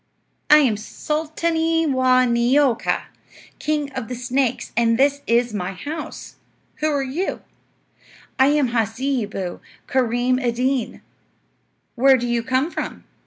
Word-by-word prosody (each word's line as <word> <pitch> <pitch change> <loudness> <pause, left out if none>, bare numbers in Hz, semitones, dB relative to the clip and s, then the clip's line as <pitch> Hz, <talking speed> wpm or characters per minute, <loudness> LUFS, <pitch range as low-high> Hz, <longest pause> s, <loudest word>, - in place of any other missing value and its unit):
"I 300 - +9
am 255 -8 +3
Sulta'nee 320 +6 -1
Waa' 255 -3 +3
Neeo'ka, 245 +2 +2 0.6
king 295 -2 -1
of 225 - -5
the 250 - -5
snakes, 250 +1 -1
and 230 0 +3
this 280 +2 +2
is 235 0 +2
my 190 -2 -3
house. 300 - -7 0.4
Who 310 - 0
are 285 -2 0
you?" 295 +9 -3 1.0
"I 265 - +6
am 290 -3 +2
Hasseeboo 225 -4 -2 0.3
Kareem 250 0 +1
Ed 240 -2 0
Deen." 255 -1 -1 0.9
"Where 265 +2 +5
do 245 -1 -3
you 240 -1 0
come 260 +7 0
from?" - - -5
255 Hz, 125 wpm, -21 LUFS, 235-290 Hz, 1.0 s, I